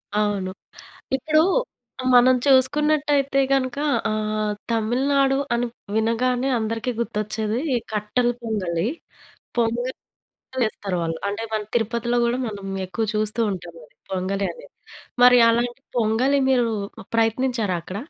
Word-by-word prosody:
అవును. 205 -3 0 0.7
ఇప్పుడు 310 +3 +2 0.6
ఆహ్, - - -4
మనం 255 +1 +7
చూసుకున్నట్టయితే 280 +1 +3
గనుక 255 -1 +1 0.3
ఆహ్, 215 0 -1 0.2
తమిళనాడు 270 +5 +2 0.2
అని 240 +1 0 0.3
వినగానే 245 +4 +1
అందరికి 225 +2 -2
గుర్తొచ్చేది 215 0 -2 0.2
ఈ - - +3 0.2
కట్టెల 215 +4 0
పొంగలి. 185 -6 -1 0.7
పొంగలి 240 +2 0 0.7
చేస్తారు 200 -4 -2
వాళ్ళు. 165 0 -2
అంటే 205 +3 -3
మన 215 -1 0
తిరుపతిలో 235 +1 0
గూడా 240 +2 0
మనం 200 -2 -7 0.2
ఎక్కువ 220 +4 -2
చూస్తూ 215 +2 -1
ఉంటామది, 170 -4 -9 0.2
పొంగలి 190 +1 -1
అనేది. - - -15 0.5
మరి 250 0 +8
అలాంటి 240 +2 0 0.2
పొంగలి, 240 +6 +2
మీరు 245 -3 +3 0.3
ప్ - - -11
ప్రయత్నించారా 225 -4 +1
అక్కడ? 185 +3 -7
230 Hz, 115 wpm, -23 LUFS, 210-255 Hz, 0.7 s, మరి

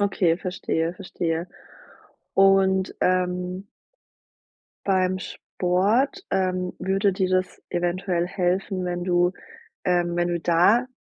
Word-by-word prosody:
Okay, 185 -4 +2
verstehe, 170 -2 -2
verstehe. 170 -3 -3 0.9
Und 195 -1 +3
ähm 180 +1 0 1.2
beim 185 -1 +2
Sport, 205 - 0
ähm, 185 -1 0
würde 195 +1 +1
dir 185 -1 0
das 185 -1 -1
eventuell 175 0 -1
helfen, 185 +1 -1
wenn 175 0 -3
du, 175 0 +2 0.5
ähm 175 -1 +1
wenn 175 0 +1
du 175 - -1
da 175 +9 +3
185 Hz, 105 wpm, -24 LUFS, 175-190 Hz, 1.2 s, Und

